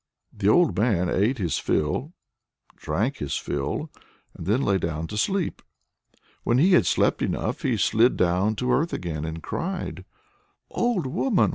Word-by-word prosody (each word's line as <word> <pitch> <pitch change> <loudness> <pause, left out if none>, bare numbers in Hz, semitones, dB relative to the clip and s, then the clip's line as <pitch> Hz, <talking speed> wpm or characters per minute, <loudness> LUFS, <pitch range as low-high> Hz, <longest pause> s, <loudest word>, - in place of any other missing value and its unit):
The 100 -1 +1
old 175 +6 +4
man 100 -6 +1
ate 110 +8 +1
his 90 -7 -1
fill, 120 - -1 0.6
drank 120 +8 -2
his 70 -1 -2
fill, 70 -1 -3 0.4
and 85 - -9
then 115 +7 +2
lay 100 -1 +2
down 80 -1 -3
to 105 - -7
sleep. 190 - -1 0.8
When 120 - +2
he 170 +9 +4
had 95 - +5
slept - - +2
enough - - -2
he - - 0
slid 115 +3 +3
down 90 +4 +2
to 125 +3 -1
earth 160 +7 +1
again, 80 -3 -3
and 80 0 -6
cried: 190 +1 -4 0.7
"Old 235 - 0
woman! 185 - +2
105 Hz, 155 wpm, -25 LUFS, -, 0.8 s, had